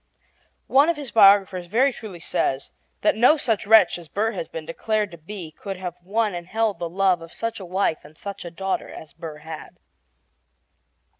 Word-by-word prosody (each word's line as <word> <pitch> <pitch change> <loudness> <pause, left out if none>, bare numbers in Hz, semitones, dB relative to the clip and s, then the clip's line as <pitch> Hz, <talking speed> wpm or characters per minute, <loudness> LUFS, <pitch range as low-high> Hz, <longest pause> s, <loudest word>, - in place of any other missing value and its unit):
One 280 +4 +4
of 340 - +1
his 285 -4 -6
biographers 195 -4 +5
very 255 +8 +3
truly 205 -8 -8
says 135 -4 -1 0.3
that 215 - +3
no 250 +8 +5
such 225 -7 0
wretch 215 -5 +6
as 170 - -13
Burr 215 +7 0
has 185 -6 -5
been 160 -1 -7
declared 210 +5 -1
to 170 - -10
be 170 -1 -8
could 195 +4 -7
have 180 -1 -5
won 210 +3 0
and 175 -1 -6
held 220 -2 0
the 170 - -3
love 185 -1 +2
of 165 0 -11
such 230 -1 -4
a 190 - -8
wife 180 -2 0
and 150 +1 -16
such 200 -1 -7
a 175 - -6
daughter 190 +3 -3
as 150 -3 -11
Burr 160 -2 -8
had. 160 -1 -9
195 Hz, 195 wpm, -23 LUFS, 170-220 Hz, 0.3 s, wretch